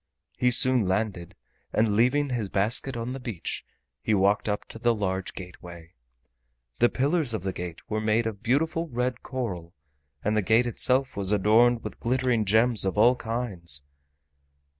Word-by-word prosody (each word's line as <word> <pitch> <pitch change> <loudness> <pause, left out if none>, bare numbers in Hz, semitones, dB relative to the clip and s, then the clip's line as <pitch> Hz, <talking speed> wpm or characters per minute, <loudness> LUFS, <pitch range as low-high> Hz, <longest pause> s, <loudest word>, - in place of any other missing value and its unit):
He 125 - +2
soon 125 -3 +4
landed, 95 -3 -2 0.4
and 110 -2 +1
leaving 130 +6 +2
his 115 -5 -2
basket 115 +7 0
on 120 +2 -4
the 135 - -6
beach, 115 -9 -5 0.4
he 110 - +1
walked 100 +2 +2
up 105 - -3
to 115 - -10
the 120 0 +2
large 95 -3 -3
gateway. 85 -2 -11 0.9
The 120 - +5
pillars 140 -3 +1
of 100 - -5
the 95 -1 -2
gate 85 -1 -7
were 110 0 -2
made 110 +2 +1
of 110 -2 -4
beautiful 160 +7 0
red 125 0 -2
coral, 90 -10 -5 0.5
and 105 +1 0
the 110 - +2
gate 110 +5 +3
itself 130 +2 +1
was 100 -1 +2
adorned 115 +4 +3
with - - -7
glittering 125 -2 +1
gems 110 +3 +3
of 95 +1 0
all 120 +4 +5
kinds. 100 - -4
110 Hz, 160 wpm, -26 LUFS, 95-125 Hz, 0.9 s, The